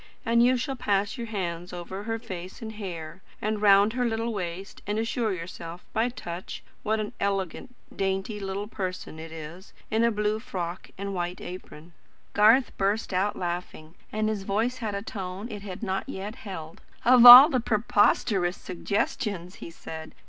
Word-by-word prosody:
and 235 0 +4
you 250 +2 +4
shall 270 +2 -3
pass 205 -4 0
your 235 -2 -5
hands 180 -5 -4
over 185 +3 -7
her 225 0 -1
face 185 -4 -8
and 220 -1 -6
hair, 180 -5 -7 0.2
and 215 0 -2
round 205 +1 +6
her 250 0 0
little 230 0 -1
waist, 185 0 -5
and 205 +1 -1
assure 225 0 0
yourself, 170 -1 -7
by 225 +3 +1
touch, 175 -7 -7 0.2
what 220 +1 0
an 210 -1 -4
elegant, 200 +5 -2 0.2
dainty 195 +2 -2
little 195 +1 -4
person 185 -6 -5
it 160 0 -8
is, 165 +4 -9 0.2
in 220 +1 +2
a 235 - +5
blue 210 0 0
frock 185 -7 -5
and 200 +1 -4
white 175 -1 -3
apron." 175 -2 -10 0.4
Garth 225 +5 +5
burst 200 +1 0
out 190 +3 +1
laughing, 175 -3 -5 0.2
and 215 0 0
his 215 -2 -1
voice 220 +6 -1
had 215 -4 -3
a 200 - -4
tone 195 0 -6
it 205 -1 -6
had 195 +1 -8
not 195 +5 -2
yet 205 -3 -5
held. 165 -6 -8 0.2
"Of 245 0 +7
all 245 +3 +13
the 265 -6 +1
preposterous 205 -4 +2
suggestions!" 185 -1 -3
he - - -8
said. 160 -1 -9
200 Hz, 170 wpm, -27 LUFS, 180-220 Hz, 0.4 s, all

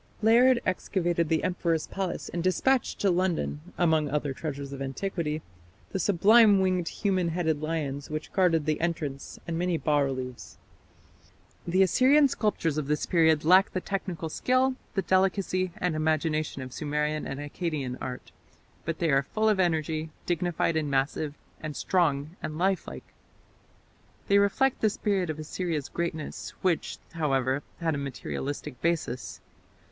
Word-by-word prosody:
Layard 240 +3 +6
excavated 175 -3 0
the 160 -1 +1
emperor's 170 -3 0
palace 190 -3 -4
and 170 -1 -3
dispatched 250 +8 +1
to 195 - +3
London, 175 -4 0 0.2
among 160 -4 +2
other 145 -1 -1
treasures 140 -1 -5
of 135 - -7
antiquity, 155 +2 -3 0.5
the 190 - -2
sublime 205 +3 +6
winged 185 -2 +1
human 190 -3 0
headed 160 -3 0
lions 150 -3 -3
which 155 0 -5
guarded 170 -5 +3
the 155 0 0
entrance, 155 -5 -3
and 165 -1 -2
many 175 -1 +1
bas 150 -2 +2
reliefs. 130 -2 -5 1.1
The 185 +3 +4
Assyrian 270 - +5
sculptures 165 - 0
of 145 - -4
this 150 0 0
period 160 -3 +3
lack 185 +4 +6
the 185 - 0
technical 185 -3 -4
skill, 255 +10 +2 0.2
the 195 - +1
delicacy 185 -1 +1
and 180 -3 -1
imagination 155 -2 0
of 130 -1 -9
Sumerian 150 0 -1
and 135 - -5
Akkadian 145 -3 -3
art, 125 -1 -6 0.5
but 165 0 -2
they 165 -2 +1
are 135 0 +4
full 215 +10 -1
of 210 -3 +2
energy, 160 -2 0 0.2
dignified 175 -1 0
and 155 -2 0
massive, 140 +2 0 0.3
and 155 -1 -5
strong 155 -3 0
and 155 - -4
lifelike. 190 +2 -2 1.2
They 200 0 +6
reflect 250 +7 +2
the 215 - +4
spirit 195 -4 -1
of 155 - -3
Assyria's 155 -1 -3
greatness, 170 -2 -4
which, 180 -3 0
however, 135 -4 0 0.2
had 165 -1 +1
a 145 - -2
materialistic 140 -1 -5
basis. 150 - -2
165 Hz, 145 wpm, -28 LUFS, 150-185 Hz, 1.2 s, Layard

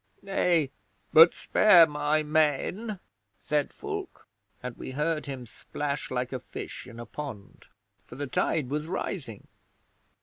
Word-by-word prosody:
'"Nay; 175 -7 +1 0.4
but 165 +2 +9
spare 180 -6 +6
my 150 0 0
men," 155 +8 0 0.4
said 150 -1 -1
Fulke; 410 -2 -6 0.4
and 125 -2 -5
we - - -7
heard 155 0 0
him 130 -3 -6
splash 140 +4 -4
like 125 0 -2
a 130 - -2
fish - - -8
in 120 -2 -11
a 120 - -6
pond, 135 -10 -8 0.4
for - - -12
the 145 - -3
tide 140 0 0
was 150 +1 -2
rising. 135 - -5
150 Hz, 135 wpm, -28 LUFS, 135-165 Hz, 0.4 s, but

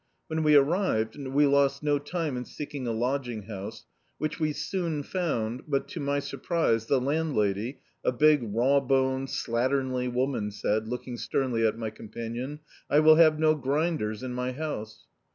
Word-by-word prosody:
When 160 0 -1
we 150 -1 +5
arrived, 140 - +2
we 140 0 +1
lost 140 0 +3
no 145 -1 +2
time 155 -1 -3
in 125 - -3
seeking 145 0 -6
a - - 0
lodging 120 -1 -2
house, 105 +1 -7 0.3
which 155 +2 -3
we 155 -1 +1
sowi 155 -1 -2
found, 125 -10 -2
but, 140 -2 0
to - - -6
my 140 0 0
sur 140 -1 -5
prise, 115 -9 +1
the 135 - +3
landlady, 130 -5 0 0.2
a - - +2
big 150 +3 +5
raw 120 +5 +2
txHied, 130 0 +1
slatternly 125 +1 0
woman 125 -4 0
said, 105 +1 -1
looking 125 +1 -5
sternly 120 -3 0
at 110 - -2
my 110 -2 -3
companion: 115 +7 -6 0.3
"I 145 - +5
will 155 0 +7
have 155 -2 +6
no 155 0 +4
grinders 140 -6 -1
in 125 -1 -4
my 125 +1 -2
house." 115 -7 -5
135 Hz, 170 wpm, -28 LUFS, 115-150 Hz, 0.3 s, will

